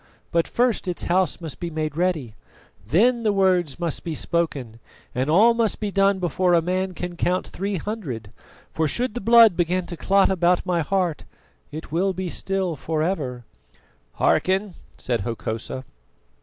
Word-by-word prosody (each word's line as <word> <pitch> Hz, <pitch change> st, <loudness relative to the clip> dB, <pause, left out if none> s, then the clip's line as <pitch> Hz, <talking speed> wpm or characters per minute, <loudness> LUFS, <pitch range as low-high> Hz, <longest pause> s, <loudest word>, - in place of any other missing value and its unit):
But 170 Hz, -1 st, +2 dB
first 240 Hz, -5 st, 0 dB
its 180 Hz, -, -2 dB
house 185 Hz, +1 st, +1 dB
must 160 Hz, -5 st, -7 dB
be 175 Hz, -, -3 dB
made 155 Hz, -2 st, -3 dB
ready. 165 Hz, -9 st, -1 dB, 0.5 s
Then 235 Hz, -, +3 dB
the 215 Hz, -2 st, +2 dB
words 180 Hz, -7 st, +1 dB
must 170 Hz, -4 st, -3 dB
be 165 Hz, -2 st, -4 dB
spoken, 140 Hz, -10 st, -2 dB, 0.3 s
and 130 Hz, +3 st, -1 dB
all 215 Hz, +9 st, +6 dB
must 230 Hz, -2 st, 0 dB
be 210 Hz, -2 st, -2 dB
done 195 Hz, 0 st, +3 dB
before 180 Hz, 0 st, +1 dB
a -, -, +5 dB
man 185 Hz, +1 st, -1 dB
can 180 Hz, 0 st, -5 dB
count 180 Hz, +2 st, 0 dB
three 195 Hz, +2 st, -4 dB
hundred; 155 Hz, -, -5 dB, 0.4 s
for 160 Hz, -1 st, +1 dB
should 240 Hz, -, -1 dB
the 245 Hz, -, -4 dB
blood 230 Hz, -2 st, +7 dB
begin 180 Hz, +1 st, 0 dB
to 175 Hz, -, -7 dB
clot 195 Hz, +3 st, +3 dB
about 180 Hz, -1 st, +2 dB
my 180 Hz, -2 st, +1 dB
heart, 175 Hz, 0 st, -1 dB, 0.5 s
it 155 Hz, 0 st, -8 dB
will 190 Hz, +4 st, +1 dB
be 185 Hz, -1 st, -4 dB
still 190 Hz, -3 st, -2 dB
for 155 Hz, +1 st, -2 dB
ever." 135 Hz, -9 st, -3 dB, 0.7 s
"Hearken," 190 Hz, +1 st, +1 dB, 0.2 s
said 120 Hz, -4 st, -1 dB
Hokosa. 115 Hz, +3 st, -4 dB
180 Hz, 165 wpm, -23 LUFS, 155-195 Hz, 0.7 s, blood